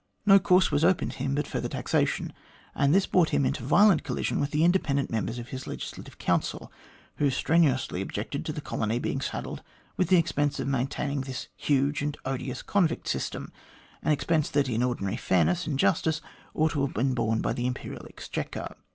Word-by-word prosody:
No 195 -1 +8
course 185 -1 +4
was 145 - +2
open 180 +1 +3
to - - -7
him 135 0 -1
but 150 - 0
further - - -3
taxation, - - 0 0.4
and 140 - +2
this 190 +4 +4
brought 175 -3 +3
him 140 - +2
into - - -1
violent 175 - +5
collision 135 -4 -1
with 140 - 0
the 150 +2 +1
independent 160 -6 +2
members 115 +1 -2
of 120 0 -7
his 130 0 -6
Legislative - - -7
Council, - - -1 0.5
who 145 - +3
strenuously 135 - +2
objected 105 +8 -4
to - - -1
the 150 0 -5
colony 115 -4 -1
being 135 +2 -2
saddled - - -4 0.4
with 185 - +2
the 185 - +5
expense 145 -4 +1
of - - -2
maintaining 140 +1 -1
this 130 -1 -6
huge 140 +1 +1
and 145 0 -2
odious 130 -1 -3
convict 175 -5 +1
system - - -3 0.5
an - - +1
expense 155 +1 +1
that 145 -2 +1
in 120 -2 0
ordinary 120 -4 -1
fairness 170 - +1
and 145 -4 -1
justice 160 +1 +2 0.4
ought 155 0 +2
to 145 - 0
have 140 - -2
been 130 +4 +1
borne 115 -2 0
by - - 0
the 120 0 -1
Imperial 125 - -5
Exchequer. - - -5
140 Hz, 190 wpm, -27 LUFS, 130-160 Hz, 0.5 s, No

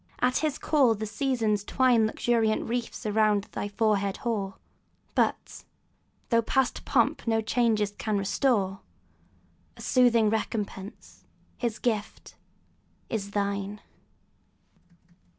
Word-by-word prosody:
at 250 0 +2
his 305 -2 -1
call 265 -7 +3
the 215 +1 -4
Seasons 215 -2 0
twine 240 -1 +3
Luxuriant 225 -1 0
wreaths 240 -1 -3
around 210 -1 +2
thy - - -3
forehead 200 -2 0
hoar; 200 -5 -1 0.6
And, - - +3 0.9
though 230 -1 +4
past 265 +3 0
pomp - - +1
no 225 -1 +2
changes 220 -2 +1
can 215 -2 0
restore, 195 -1 +1 1.0
A - - -11
soothing 235 -4 +4
recompence, 210 -2 -5 0.3
his 235 -3 -2
gift, 215 -4 -3 0.8
is 200 -3 -3
thine! 200 0 -2
220 Hz, 105 wpm, -27 LUFS, 205-240 Hz, 1.0 s, though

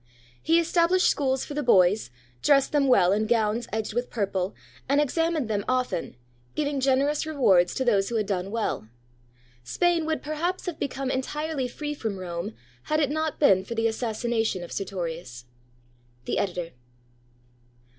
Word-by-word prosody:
He 330 +1 +4
established 340 +2 +3
schools 265 -2 0
for - - -7
the 295 - -1
boys, 195 - +4 0.3
dressed 275 -2 +4
them 285 -2 +2
well 185 -8 +5
in 215 +2 +1
gowns 225 0 +1
edged 220 -1 -2
with 245 +2 -2
purple, 195 -3 -2 0.3
and 280 +1 +4
examined 315 -1 +1
them 205 -2 -1
often, 255 - -1 0.4
giving 285 -2 -1
generous 275 +3 +2
rewards 195 - +3
to 260 - -1
those 200 -5 +2
who 235 - -3
had 215 -2 +1
done 190 -1 -2
well. 220 - -2 0.8
Spain 335 - +1
would 315 -1 -1
perhaps 325 +5 -2
have 355 -4 -4
become 270 -1 -2
entirely 290 +1 -2
free 295 +4 -5
from 220 -8 -4
Rome, 180 +3 -5 0.3
had 305 0 +1
it 290 -2 +1
not 315 0 -2
been 195 -10 +5
for 235 - -6
the 225 0 0
assassination 225 -3 -1
of 175 - -9
Sertorius. 165 -10 -5 0.8
The - - -1
Editor. 175 -3 -2
245 Hz, 155 wpm, -26 LUFS, 195-295 Hz, 0.8 s, well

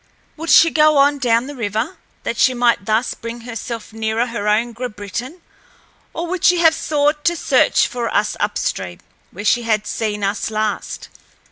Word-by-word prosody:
Would 325 +1 -6
she 330 - +7
go 305 -1 +4
on 285 +1 +4
down 235 -2 +2
the 290 - -7
river, 230 - -3 0.3
that - - -2
she 255 - +4
might 240 -4 +2
thus 220 +3 +1
bring 235 +1 -8
herself 230 -1 -7
nearer 220 +1 -1
her 230 -4 -4
own 225 +3 +1
Grabritin, 240 - -6 0.7
or 335 - -4
would 360 0 -4
she 355 - +5
have 325 -2 +5
sought 295 -1 0
to 345 - +3
search - - +3
for 240 -2 -3
us 210 - 0
upstream, 95 - -2 0.3
where 205 +4 -9
she 240 +3 +3
had 215 -2 0
seen 210 -2 -3
us 200 +2 -1
last? 215 -1 -3
235 Hz, 170 wpm, -19 LUFS, 215-290 Hz, 0.7 s, she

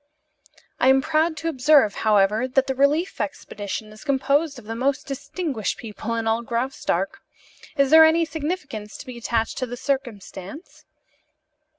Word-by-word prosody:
"I 255 - +3
am 265 0 +6
proud 315 +1 +1
to 325 - -4
observe, 280 -6 +4
however, 215 +3 +3
that 265 +1 +2
the 265 - -1
relief 285 +7 +1
expedition 210 +1 -5
is 215 - -13
composed 280 +1 +1
of 245 - -12
the 225 - -5
most 275 +5 -1
distinguished 275 - -3
people 225 0 -5
in 230 -1 -2
all 225 +1 +1
Graustark. 235 -6 -2 0.6
Is 275 0 +3
there 320 0 +10
any 325 +1 +4
significance 295 - -5
to - - -10
be 250 -2 -8
attached 225 -1 -1
to 255 - -2
the 245 +1 -6
circumstance?" 245 - -5
260 Hz, 155 wpm, -23 LUFS, 225-295 Hz, 0.6 s, there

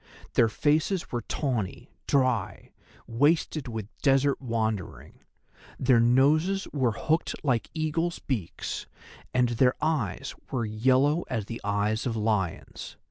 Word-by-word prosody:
Their 115 - +4
faces 155 - +1
were 120 - -1
tawny, 120 -11 -3 0.2
dry, 120 -8 0 0.3
wasted 145 +3 +1
with 110 -4 -5
desert 135 0 +3
wandering; 110 -6 -3 0.6
their 125 -2 +4
noses 150 +11 +3
were 130 -6 +1
hooked 160 +7 0
like 125 -5 +1
eagles' 165 +2 -1
beaks, 110 - -4 0.4
and 125 -1 +2
their 125 +2 +3
eyes 135 - -1 0.2
were 120 -3 -1
yellow 130 +8 +2
as 115 -6 -2
the 115 +2 -7
eyes 105 +3 0
of 115 - -2
lions. 105 -5 -2
125 Hz, 120 wpm, -27 LUFS, 110-145 Hz, 0.6 s, Their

